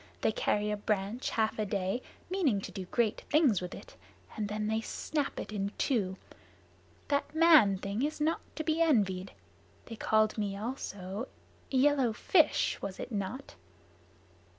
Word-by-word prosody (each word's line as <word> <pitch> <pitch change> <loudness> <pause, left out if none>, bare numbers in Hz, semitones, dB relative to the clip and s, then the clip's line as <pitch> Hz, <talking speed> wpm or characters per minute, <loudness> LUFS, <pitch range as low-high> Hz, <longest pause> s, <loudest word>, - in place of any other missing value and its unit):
They - - +3
carry 210 - 0
a 210 - -1
branch 205 +3 -1
half 220 -1 0
a 215 - +1
day, 195 +4 -1 0.3
meaning 345 - +1
to - - -7
do 190 -3 -6
great 220 +3 0
things 280 - +4
with 180 0 -5
it, - - -12 0.4
and 210 -2 -2
then 210 0 -2
they 220 +1 0
snap 290 +5 -3
it - - -6
in 200 -1 -2
two. 195 -8 0 0.9
That 285 +1 0
man 310 - +6
thing 200 +4 -3
is 300 +3 -1
not 315 +2 +1
to 315 - -3
be 315 +1 +1
envied. 195 - +2 0.5
They 230 - -8
called 215 0 +2
me 200 -2 -2
also 205 -2 -5 0.4
`yellow 265 -3 +3
fish' 315 +4 +3
was 195 -1 -5
it - - -6
not?" 210 +6 -4
220 Hz, 155 wpm, -31 LUFS, 200-280 Hz, 0.9 s, man